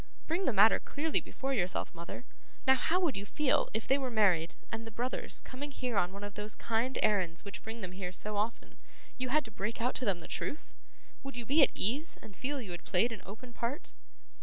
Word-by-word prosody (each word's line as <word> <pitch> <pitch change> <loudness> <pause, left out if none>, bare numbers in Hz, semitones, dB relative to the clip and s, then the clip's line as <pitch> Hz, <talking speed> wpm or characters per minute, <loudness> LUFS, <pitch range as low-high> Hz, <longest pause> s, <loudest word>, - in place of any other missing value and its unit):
Bring 350 +4 0
the - - +4
matter 215 +1 +7
clearly 310 +2 0
before 270 0 -3
yourself, 185 -7 0
mother. 170 +8 -7 0.4
Now, 265 - +8
how 320 +7 +2
would 325 -8 +2
you 195 - -2
feel, 270 +7 +2
if 220 0 -2
they 270 +1 +4
were 265 -2 -1
married, 190 -8 +3 0.2
and 225 0 -4
the - - -4
brothers, 240 +4 -1
coming 275 +3 -6
here 255 -4 -3
on 180 -2 +3
one 200 +1 -8
of 205 0 -5
those 210 +1 -1
kind 235 +3 0
errands 190 -5 +2
which 200 0 -6
bring 225 +1 -6
them 185 -2 -4
here 185 -1 -4
so 210 +3 -2
often, 215 +3 -2 0.4
you 255 0 -1
had 300 +1 +3
to 225 - -9
break 210 +2 -3
out 245 +2 +1
to 255 - -3
them 195 -5 +2
the - - -9
truth? 300 - -4 0.5
Would 275 -2 -7
you 240 - -3
be 290 +7 +5
at 275 - +8
ease, 280 - +1
and 200 - -12
feel 280 +2 -2
that 250 - -5
you 185 - -6
had 175 - -6
played 220 +7 +2
an 225 - -6
open 240 +5 -9
part? 240 +5 -3
230 Hz, 235 wpm, -33 LUFS, 200-265 Hz, 0.5 s, Now